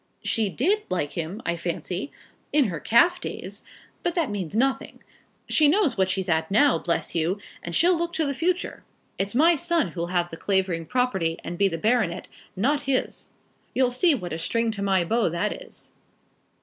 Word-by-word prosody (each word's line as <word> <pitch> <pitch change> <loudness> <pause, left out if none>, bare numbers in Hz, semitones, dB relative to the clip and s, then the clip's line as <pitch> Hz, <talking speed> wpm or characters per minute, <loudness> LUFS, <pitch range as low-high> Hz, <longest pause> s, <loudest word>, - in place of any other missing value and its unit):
"She 220 -3 +1
did 370 - +1
like 175 -6 -1
him, 175 +7 -5
I 170 - 0
fancy, 175 - -4 0.4
in 285 -7 +3
her 165 -3 -4
calf 345 - +4
days; - - -6 0.4
but 345 - -1
that 330 -10 0
means 195 -3 -4
nothing. 265 +4 -1 0.4
She 305 - +4
knows 315 - +3
what 190 -1 +1
she's 190 0 -1
at 160 -2 +1
now, 255 +8 +4
bless 170 - -2
you, 170 +4 0 0.2
and 170 -1 -5
she'll 355 +2 +4
look 340 0 -2
to 320 - 0
the 280 - -1
future. 355 +6 -1 0.4
It's 195 +3 -2
my 330 +6 +5
son 335 0 +1
who'll 170 -1 -4
have 175 -1 0
the 165 - -7
Clavering 185 -4 0
property 190 -11 0
and 175 - -5
be 200 +3 +3
the 165 -3 -3
baronet, 215 -3 0 0.3
not 275 +8 0
his. 260 - -1 0.5
You 255 -1 +3
see 295 +5 +3
what 180 -9 -5
a 160 - -4
string 230 +6 0
to 205 -2 -6
my 190 -2 +2
bow 225 0 +1
that 175 +6 -1
is." - - -11
210 Hz, 190 wpm, -25 LUFS, 175-280 Hz, 0.5 s, my